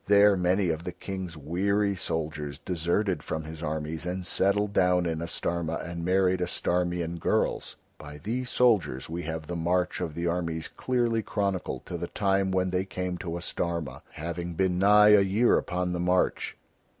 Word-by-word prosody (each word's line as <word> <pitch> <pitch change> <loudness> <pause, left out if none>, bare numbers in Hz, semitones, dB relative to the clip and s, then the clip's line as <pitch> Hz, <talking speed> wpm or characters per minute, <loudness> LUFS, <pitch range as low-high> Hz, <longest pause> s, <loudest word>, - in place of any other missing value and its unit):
There 100 0 +6
many 90 +1 +2
of 80 0 -2
the 90 - -5
King's 95 -3 -6
weary 100 +7 0
soldiers 75 -5 -3
deserted 90 +4 -1
from 80 - -4
his 80 0 -8
armies 80 0 -3
and 90 +1 -3
settled 100 +3 +1
down 90 -2 +3
in 80 -1 -2
Astarma 85 0 -2
and 85 0 -5
married 95 0 +2
Astarmian 85 -1 -1
girls. - - 0 0.2
By 75 0 -9
these 120 - -3
soldiers 90 - +2
we 85 +1 -3
have 80 -1 -4
the 90 - -5
march 90 +2 0
of 80 -4 -3
the 85 - -2
armies 85 -2 -1
clearly 120 -3 0
chronicled 100 -4 -2
to 85 - -5
the 85 - -3
time 95 0 +1
when 95 -1 +1
they 90 +1 +1
came 90 -2 -4
to 85 -1 -4
Astarma, 85 -5 -3
having 85 +2 -5
been 90 0 +1
nigh 105 +2 +7
a 105 -1 +8
year 100 +5 +3
upon 90 0 -2
the 90 - -2
march. 90 +1 +1
90 Hz, 170 wpm, -28 LUFS, 85-95 Hz, 0.2 s, a